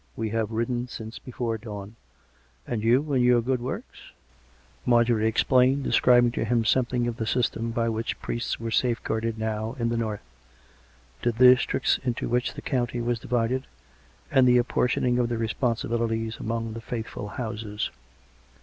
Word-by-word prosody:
" - - -36
We 110 -1 -2
have 110 -1 0
ridden 120 +2 -1
since 110 -1 -8
before 120 -3 -3
dawn.... 105 -1 -8 0.7
And 115 -3 -2
you, 130 +7 +2
and 130 -2 +3
your 125 -1 +5
good 125 +1 -1
works? 125 - -6 0.4
" 65 0 -32
Marjorie 120 -2 +3
explained, 130 +4 +3
describing 120 -2 +4
to 120 - -2
him 115 0 +1
something 125 0 +2
of 120 -1 -3
the 110 - -3
system 115 -2 0
by 115 0 0
which 115 0 -2
priests 120 - -3
were 115 0 -4
safeguarded 115 -1 0
now 110 0 -3
in 115 -2 0
the 115 - -1
north 110 -3 -3 0.5
— 65 -1 -31
the 120 - +2
districts 125 +2 +4
into 125 -2 -2
which 125 +1 0
the - - -8
county 120 -2 -1
was 120 0 -1
divided, 125 +3 -1 0.6
and 130 -2 +5
the 125 0 +6
apportioning 125 0 +1
of 120 -1 +1
the 120 - -1
responsibilities 115 -1 -1
among 115 0 -3
the 115 - -7
faithful 115 -3 -5
houses. 105 -1 -4
115 Hz, 165 wpm, -26 LUFS, 110-125 Hz, 0.7 s, the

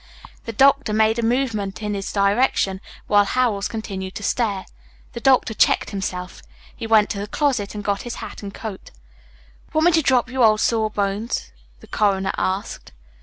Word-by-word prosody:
The 230 - -4
doctor 275 0 +3
made 220 +1 +3
a - - -1
movement 220 -5 -1
in 210 0 -2
his 195 -1 -4
direction 200 -1 +1 0.2
while 205 -1 +4
Howells 210 -2 0
continued 195 -4 -6
to 210 - -6
stare. 200 -3 -1 0.5
The 235 - -5
doctor 255 -3 +3
checked - - +2
himself. 185 -2 -5 0.3
He 225 - -6
went 215 -2 +4
to 200 - -3
the 205 - -4
closet 240 -5 -1
and 205 - -5
got 200 -1 -1
his 240 -1 -6
hat 220 -3 -8
and 200 -1 -6
coat. 205 -2 -8 0.8
"Want 315 +1 +2
me 350 - +6
to 325 -1 +3
drop 255 -4 +2
you, 255 0 0
old 215 -1 +5
sawbones?" 215 -1 -1 0.3
the - - -14
coroner 195 -2 +1
asked. 185 - -3
215 Hz, 170 wpm, -22 LUFS, 200-235 Hz, 0.8 s, me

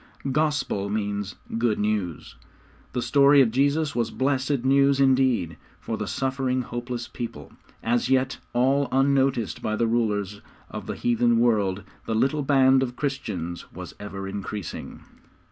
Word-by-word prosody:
'Gospel' 145 -9 0
means 100 -1 -2 0.2
good 115 -2 +1
news. 105 -6 -2 0.6
The 125 - -1
story 140 0 +5
of 125 -5 +5
Jesus 140 +4 +1
was 120 -2 0
blessed 130 -1 0
news 140 +1 +4
indeed, 130 - +2 0.2
for - - -4
the - - -4
suffering, 130 -1 -1
hopeless 120 0 -5
people. 75 - -7 0.3
As 120 +2 +1
yet 130 0 +1
all 135 +3 +2
unnoticed 135 -3 +1
by 110 - -1
the 115 - +1
rulers 105 -3 -1 0.3
of - - -7
the - - -3
heathen 120 0 +2
world, 105 -5 +2 0.2
the 110 - -1
little 135 +6 +1
band 135 -1 +4
of 125 -2 -2
Christians 105 - -4
was - - -9
ever 95 -1 -6
increasing. 100 -1 -6
120 Hz, 140 wpm, -25 LUFS, 105-135 Hz, 0.6 s, story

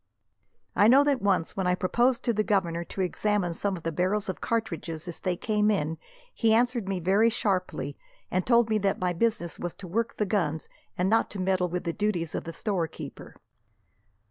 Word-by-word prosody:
"I 205 - +6
know 265 +5 +7
that 285 -3 +1
once, 190 -5 +1
when 190 -2 -1
I 180 - +3
proposed 240 +7 +1
to 235 - +1
the 215 - +1
governor 170 -5 0
to 190 - -5
examine 190 -1 0
some 195 +3 -2
of 170 - -11
the 165 - -1
barrels 190 +5 0
of 190 - -4
cartridges 170 -8 -3
as 175 - -7
they 180 -1 -1
came 210 +1 +1
in, 160 -6 0 0.3
he 225 -1 +3
answered 240 -3 +1
me 190 -2 -1
very 195 +6 +4
sharply, 185 -10 -2 0.3
and 185 +1 +1
told 235 0 +4
me 215 -1 +1
that 195 -1 +1
my 180 -1 0
business 175 -3 -1
was 175 - -4
to 185 - -10
work 230 +6 -2
the 210 - +1
guns, 170 -7 -1 0.3
and 180 - +1
not 225 +3 +3
to 200 - -7
meddle 185 -1 +1
with 180 +1 -3
the 170 -2 -2
duties 180 -6 -1
of - - -3
the 165 - -6
storekeeper." 175 -3 -4
190 Hz, 200 wpm, -27 LUFS, 175-215 Hz, 0.3 s, know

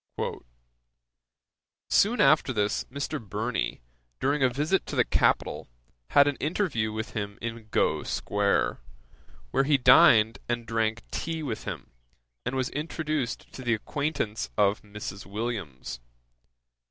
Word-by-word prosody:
'Soon 230 +5 +3
after 155 -3 +5
this, 105 -4 0
Mr. 140 0 -4
Burney, 110 - -2 0.4
during 140 +1 +1
a 130 - +5
visit 150 +9 +1
to - - -4
the - - +4
capital, - - +1 0.4
had 140 0 +5
an 145 - 0
interview 145 - 0
with 110 0 -4
him 100 -1 -4
in 115 -1 -6
Gough - - +1
square, 100 -1 0 0.7
where - - +3
he 145 0 +4
dined 115 -3 +6
and 120 -1 -1
drank 115 +1 -1
tea 160 -1 -3
with 120 -7 -4
him, - - -6 0.6
and 135 - -1
was 130 -1 0
introduced 150 -4 -3
to - - -8
the 120 -2 +1
acquaintance 115 - -2
of 100 0 +3
Mrs. 105 -1 -8
Williams. 95 - -4
120 Hz, 130 wpm, -27 LUFS, 105-145 Hz, 0.7 s, dined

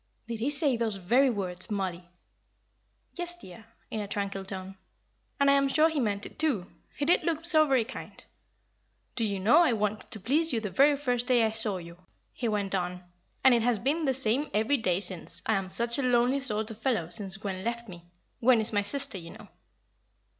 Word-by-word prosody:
"Did 230 -1 -5
he 245 +5 0
say 290 -3 +2
those 225 -3 -1
very 240 +9 +3
words, 185 -5 -3
Mollie?" 185 -4 -3 1.0
"Yes, 350 0 -3
dear," 220 - -13 0.3
in 220 - -3
a 205 - -4
tranquil 200 -1 -3
tone. 190 0 -8 0.6
"And 280 - +3
I 280 - +6
am 275 0 +3
sure 310 +4 +4
he 315 -2 -2
meant 205 -4 -1
it, - - -12
too. 275 - +1 0.3
He 290 - -2
did 340 - +4
look 330 -1 -2
so 310 -3 +5
very 260 -5 +2
kind. 260 - -10 0.9
'Do 230 - -1
you 200 -3 -1
know 210 +5 +5
I 335 -8 +4
wanted 210 -1 -2
to 220 - -7
please 290 - +1
you 230 - +1
the 210 -3 -5
very 285 +5 +4
first 250 -4 -1
day 245 -3 +4
I 220 - 0
saw 220 -3 +1
you,' 170 0 -11 0.3
he 240 - -3
went 205 -3 -1
on, 180 -1 -2 0.4
'and 265 - +7
it 235 - +3
has 240 0 +2
been 295 +9 -1
the 265 -2 +1
same 265 +3 0
every 220 +7 +2
day 185 -5 0
since. 185 -4 -1
I 220 - +1
am 195 -2 -1
such 235 +5 +2
a - - +1
lonely 250 +1 +2
sort 220 -4 -2
of 220 - -10
fellow 225 -10 -1
since 195 +1 -2
Gwen 195 -2 -5
left 235 +1 -3
me. 175 -3 -11 0.4
Gwen 245 0 +4
is 220 +1 0
my 205 - +2
sister, 270 0 +1
you 165 -1 -11
know.'" - - -13
225 Hz, 210 wpm, -28 LUFS, 195-270 Hz, 1.0 s, and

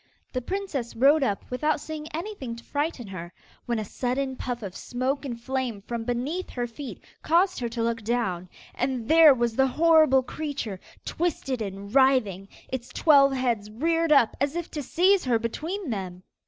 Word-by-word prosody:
The 255 - -1
princess 325 -7 -4
rode 280 +6 +5
up 205 -7 -1
without 300 +4 +1
seeing 310 0 -6
anything 315 - -5
to 235 - -12
frighten 290 -4 -2
her, 175 -2 -7 0.4
when 235 -1 0
a 215 - -2
sudden 260 +5 -2
puff 245 -2 -4
of 190 -2 -6
smoke 265 +3 -2
and 240 -4 -5
flame 255 -3 -2
from 230 0 -4
beneath 260 +10 -2
her 245 -1 -3
feet, 240 +3 -8 0.2
caused 355 +4 +2
her 240 -2 -2
to 230 0 -3
look 230 0 -1
down, 205 -6 -1 0.2
and 255 -3 -2
there 320 -1 +8
was 235 -2 0
the 265 +2 +4
horrible 310 -2 +5
creature 280 -9 -4 0.3
twisted 285 -7 -2
and 200 0 -6
writhing, 255 -8 +3 0.2
its 255 -2 -5
twelve 280 -3 +5
heads 240 -5 -1
reared 330 +8 0
up 275 -6 +5
as 280 +2 0
if 345 -1 -4
to 300 - -4
seize 365 +7 +3
her 245 -3 +3
between 310 - -4
them. 185 -3 -5
255 Hz, 175 wpm, -26 LUFS, 230-305 Hz, 0.4 s, there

